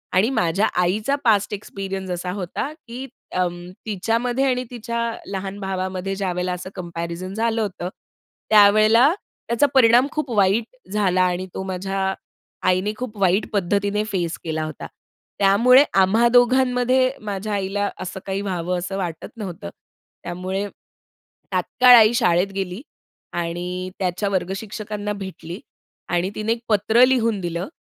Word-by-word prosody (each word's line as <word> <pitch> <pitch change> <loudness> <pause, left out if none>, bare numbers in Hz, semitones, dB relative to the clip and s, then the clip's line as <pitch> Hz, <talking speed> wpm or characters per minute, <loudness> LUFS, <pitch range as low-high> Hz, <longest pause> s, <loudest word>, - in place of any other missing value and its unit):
आणि 195 +5 +4
माझ्या 200 -5 +1
आईचा 210 +10 +1
पास्ट 210 -3 +3
एक्सपिरियन्स 195 -2 -5
असा 180 +1 -3
होता, 190 - -4 0.2
की 245 +3 -6 0.3
अं, 175 -1 0 0.3
तिच्यामध्ये 230 +5 0
आणि 250 0 0
तिच्या 235 -1 -5 0.3
लहान 195 0 -4
भावामध्ये 190 0 -3
ज्यावेळेला 180 -2 -2
असं 180 +1 -6
कम्पॅरिझन 170 +1 -5
झालं 225 +1 0
होतं, 180 -3 -3 0.6
त्यावेळेला 215 +6 +6 0.3
त्याचा 235 +4 +3
परिणाम 245 0 +6
खूप 305 -3 -3
वाईट 200 +4 +3 0.3
झाला 190 -3 +2
आणि 180 0 0
तो - - -4
माझ्या 190 +1 -2 0.5
आईने 185 +3 +2
खूप 245 -4 -6
वाईट 190 +2 +3
पद्धतीने 200 +2 +1
फेस 175 -3 -1
केला 160 -1 -2
होता. 155 -3 -7 0.5
त्यामुळे 230 +7 +6 0.2
आम्हा 220 +5 +4
दोघांमध्ये 255 +1 +4
माझ्या 205 0 -4
आईला 200 +1 -1
असं 185 +1 -5
काही 195 0 -2
व्हावं 180 -2 -2
असं 190 +2 -4
वाटत 175 -4 -4
नव्हतं. 180 - -6 0.5
त्यामुळे 190 +3 -3 0.8
तात्काळ 250 -1 +6
आई 225 -1 +7
शाळेत 175 +3 +2
गेली 190 +1 -3 0.5
आणि 175 +2 -3
त्याच्या 185 +2 -1
वर्ग 185 -2 -1
शिक्षकांना 210 0 -5
भेटली 190 -2 -7 0.5
आणि 175 +2 0
तिने 215 +1 -1
एक 230 - -7
पत्र 220 +3 +4
लिहून 230 -5 +1
दिलं, 170 0 -3
195 Hz, 135 wpm, -22 LUFS, 180-220 Hz, 0.8 s, आई